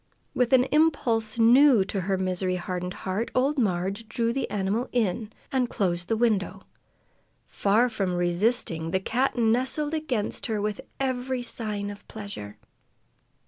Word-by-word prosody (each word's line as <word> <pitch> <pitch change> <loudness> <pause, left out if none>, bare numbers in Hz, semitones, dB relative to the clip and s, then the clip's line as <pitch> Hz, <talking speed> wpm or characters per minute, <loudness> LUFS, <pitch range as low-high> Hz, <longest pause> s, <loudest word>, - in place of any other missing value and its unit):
With 250 0 +1
an 255 -1 +6
impulse 245 -8 +2
new 240 -1 +6
to 195 0 -3
her 190 +1 0
misery 185 0 -1
hardened 180 0 -4
heart, 195 +5 -1
old 275 +3 +2
Marg 200 +1 -1
drew 230 +1 0
the 270 - -2
animal 205 +5 -1
in 220 -2 -1 0.2
and 255 -2 +1
closed 175 -3 -1
the 225 - 0
window. 200 -5 0 0.8
Far 215 +5 +2
from 195 -6 -2
resisting, 175 -1 0
the 190 - +1
cat 250 +7 0
nestled 255 +6 +1
against 265 -9 -2
her 220 -2 -1
with 210 +4 -2 0.2
every 260 -1 -1
sign 210 -4 -2
of 205 - -13
pleasure. 200 - -8
220 Hz, 140 wpm, -26 LUFS, 190-245 Hz, 0.8 s, an